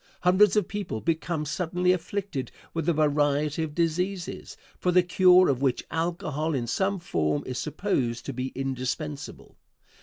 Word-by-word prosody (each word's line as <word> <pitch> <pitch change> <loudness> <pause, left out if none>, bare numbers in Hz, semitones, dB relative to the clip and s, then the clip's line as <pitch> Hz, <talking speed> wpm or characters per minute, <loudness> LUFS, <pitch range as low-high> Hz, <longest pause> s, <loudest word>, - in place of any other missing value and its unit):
Hundreds 185 +3 +5
of 210 -4 +2
people 200 - -4
become 160 +1 -1
suddenly 180 +4 0
afflicted 180 - -3 0.2
with 165 0 -1
a - - +4
variety 150 0 +1
of 155 -2 -4
diseases, 175 +2 -2 0.2
for 180 - +1
the 180 0 +5
cure 180 0 +6
of 135 -2 +1
which 135 -3 +1
alcohol 160 -2 -1
in 120 -3 -1
some 190 - 0
form 75 - -1
is 125 -1 -4
supposed 135 - -1
to 140 - -4
be 130 +1 -3
indispensable. 135 +2 -4
160 Hz, 150 wpm, -27 LUFS, 140-180 Hz, 0.2 s, cure